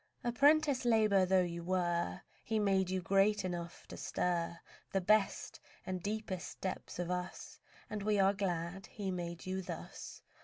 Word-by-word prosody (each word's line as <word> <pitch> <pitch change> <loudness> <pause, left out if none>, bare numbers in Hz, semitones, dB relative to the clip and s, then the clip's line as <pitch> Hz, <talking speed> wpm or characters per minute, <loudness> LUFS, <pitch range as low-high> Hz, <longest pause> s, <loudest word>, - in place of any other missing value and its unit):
Apprentice 285 +2 +4
labour 215 -5 +4
though 185 0 +5
you 170 -1 -4
were, 175 - 0 0.2
He 220 - 0
made 195 -3 +2
you 185 -1 -1
great 195 +2 +3
enough 175 -1 -5
to - - -7
stir 170 -1 -1 0.3
The 195 - +2
best 210 +2 +2 0.3
and 185 -1 -3
deepest 200 -2 -4
depths 190 - -4
of 175 0 -2
us, 180 0 -4 0.3
And 210 -1 -4
we 210 +1 +2
are 195 +1 +5
glad 190 -1 -2
He 200 -3 -4
made 170 -1 -4
you 190 0 -2
thus. 180 - -7
190 Hz, 155 wpm, -35 LUFS, 175-210 Hz, 0.3 s, though